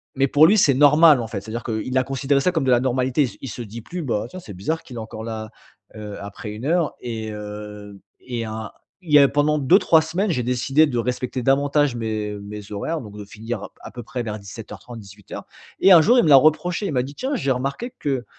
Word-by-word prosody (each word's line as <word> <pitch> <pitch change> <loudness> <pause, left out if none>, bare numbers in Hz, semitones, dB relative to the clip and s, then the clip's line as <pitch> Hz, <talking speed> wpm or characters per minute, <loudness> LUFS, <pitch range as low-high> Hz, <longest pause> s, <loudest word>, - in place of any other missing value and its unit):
Mais 135 0 +2
pour 145 +3 +5
lui, 215 - +4
c'est 140 -6 +4
normal. 150 0 +6
En 115 - -5
fait, 105 -3 -5
c'est-à-dire 110 +3 -6
qu'il 120 +3 -3
a 130 - +3
considéré 135 +1 0
ça 180 - +2
comme 160 -6 -1
de 130 - +2
la 120 - +5
normalité. 130 +2 +1
il - - 0
se - - -15
Il - - -6
se 120 - -7
dit 115 +1 -9
plus: 175 +8 -6
«Bah, 115 -7 -2
tiens, 185 - -9
c'est 110 - -11
bizarre 155 - -3
qu'il 125 - -10
est - - -4
encore 110 0 -8
là, 110 -1 -6 0.5
heu, 105 -1 -7
après 100 +1 -8
1 110 +4 -7
heure». 165 0 +1
Et 110 -2 -5
heu 105 -1 -9 0.2
et 125 -1 -8
il - - -2
y - - -3
a 110 -1 -6 0.3
il 160 - -9
y 150 - +9
a 140 - +7
pendant 145 +2 +1
2-3 160 +2 +4
semaines, 185 +6 -1
j'ai 125 -6 -1
décidé 130 +5 +2
de 125 - -3
respecter 125 +1 -3
davantage 140 0 +2
mes 110 -2 -3
mes 105 0 -9
horaires 155 +11 -3
donc 105 -3 -11
de 105 - -8
finir 110 +4 -6
p - - -7
à - - -9
peu 120 - -8
près 125 +2 -5
vers 110 -1 -4
17:30 105 +3 -10
18:00. 100 -1 -11 0.3
Et 195 - +5
un 165 - +8
jour, 240 +9 +4
il - - +4
me 155 - +2
l'a 140 - +9
reproché. 165 +7 +2
Il - - -3
m'a 125 - +2
dit: 140 +3 -9
«Tiens, 270 - -2
j'ai 135 - -1
remarqué 140 - -3
que 135 -4 -2
125 Hz, 255 wpm, -22 LUFS, 110-145 Hz, 0.5 s, y